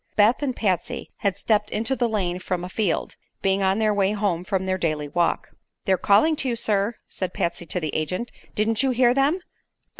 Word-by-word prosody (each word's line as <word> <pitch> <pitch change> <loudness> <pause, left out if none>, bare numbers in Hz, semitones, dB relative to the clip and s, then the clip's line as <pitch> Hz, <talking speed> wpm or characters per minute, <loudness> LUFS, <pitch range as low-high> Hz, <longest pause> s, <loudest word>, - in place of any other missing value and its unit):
Beth 215 +6 +4
and 265 -4 -1
Patsy 185 -5 -1
had 200 -2 0
stepped 210 0 +1
into 230 +5 0
the 240 -1 +1
lane 185 -5 -1
from 180 -1 -3
a 180 - -5
field, 195 -3 -1 0.3
being 195 0 +2
on 190 +1 +2
their 215 -1 +2
way 200 0 +2
home 200 -5 0
from 190 -1 -1
their 185 0 -1
daily 155 -3 -1
walk. 170 +3 0 0.4
"They're 190 - +4
calling 205 - +4
to 265 - -1
you, 235 - 0
sir," 210 0 +1
said 185 -2 -4
Patsy 170 0 -2
to 180 - -1
the 155 -3 -3
agent. 180 +9 -2 0.2
"Didn't 220 +2 +1
you 270 - +2
hear 250 -1 +4
them?" 280 +7 +2
200 Hz, 205 wpm, -24 LUFS, 180-225 Hz, 0.4 s, Beth